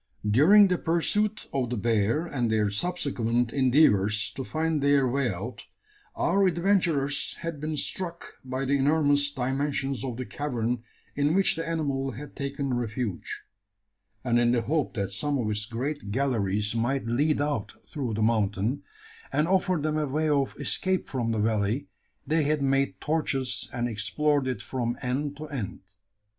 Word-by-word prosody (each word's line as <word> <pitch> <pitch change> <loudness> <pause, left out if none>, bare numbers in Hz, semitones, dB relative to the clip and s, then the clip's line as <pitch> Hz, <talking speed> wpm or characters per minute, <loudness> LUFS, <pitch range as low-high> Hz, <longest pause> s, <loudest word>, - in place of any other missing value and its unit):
During 175 - +7
the 180 -2 0
pursuit 210 +6 0
of 130 -3 0
the 125 - -2
bear, 115 - +1
and 125 -8 -1
their 105 -2 +2
subsequent 120 - -1
endeavours 115 -7 +3
to 135 - -5
find 160 +1 -1
their 140 -1 +4
way 130 0 +1
out, 105 +6 -6 0.5
our 195 +2 +3
adventurers 170 -6 +1
had 165 -3 -5
been 155 0 -2
struck 170 +3 -4
by 130 +1 -3
the 140 +1 +2
enormous 145 0 +3
dimensions 135 0 -2
of 125 -3 -4
the 130 - -4
cavern 120 -5 -2 0.3
in 145 +3 +2
which 195 0 +3
the 165 0 -4
animal 140 -5 -1
had 145 +5 -9
taken 140 -1 -3
refuge; 120 -4 -3 0.8
and 120 -2 +2
in 120 0 +3
the 120 -2 +1
hope 150 +2 -1
that 100 -3 -2
some 140 +9 -1
of 120 -4 -1
its 105 +1 -2
great 130 0 -4
galleries 105 -4 0
might 120 +4 0
lead 145 +7 +1
out 145 0 -2
through 125 -7 -3
the 110 - 0
mountain, 110 +2 +1 0.5
and 150 +2 +2
offer 185 0 +2
them 155 +1 0
a 150 - 0
way 155 +4 0
of 140 -3 +1
escape 185 -1 0
from 120 -4 -1
the 110 - -1
valley, 110 +5 0 0.4
they 155 +3 +2
had 150 0 +1
made 135 0 +1
torches, 135 -6 -1
and 120 0 -1
explored 130 +6 +1
it 130 - -3
from 120 -2 -2
end 140 +3 -2
to 155 - -6
end. 125 -10 -5
135 Hz, 160 wpm, -27 LUFS, 115-150 Hz, 0.8 s, During